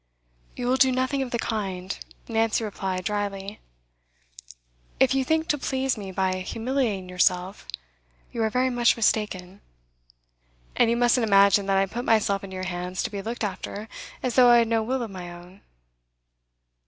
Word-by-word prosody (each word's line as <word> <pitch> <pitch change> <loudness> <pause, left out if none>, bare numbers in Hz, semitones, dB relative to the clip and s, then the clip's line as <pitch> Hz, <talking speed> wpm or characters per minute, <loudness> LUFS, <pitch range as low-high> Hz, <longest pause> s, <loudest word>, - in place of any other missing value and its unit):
'You 245 - -4
will 255 +2 +2
do 265 0 +5
nothing 260 +2 0
of 265 - -3
the 240 - -1
kind,' 195 -5 -3 0.3
Nancy 225 0 +1
replied 190 -3 -3
drily. 205 -1 -3 1.4
'If 265 0 +4
you 270 0 +2
think 320 +4 0
to 295 - +1
please 265 0 -1
me 200 -3 -7
by 185 0 0
humiliating 225 0 -2
yourself, 180 +1 0 0.6
you 235 - -3
are 220 - +2
very 255 +3 +1
much 240 -1 +3
mistaken. 200 -4 -1 1.1
And 235 - +4
you 235 - +1
mustn't 240 -1 +3
imagine 200 0 +5
that 195 -1 +2
I 195 - +3
put 235 +5 -5
myself 205 -4 +2
into 190 -1 -8
your 185 0 -4
hands 180 0 -3
to - - -3
be 200 -1 -4
looked 230 +3 -5
after 205 +1 -4 0.4
as 250 -2 0
though 245 0 +6
I 240 - +7
had 230 -1 +3
no 225 0 +1
will 250 +3 -1
of 225 - -6
my 180 -2 -7
own. 175 +3 -13
215 Hz, 170 wpm, -25 LUFS, 190-245 Hz, 1.4 s, I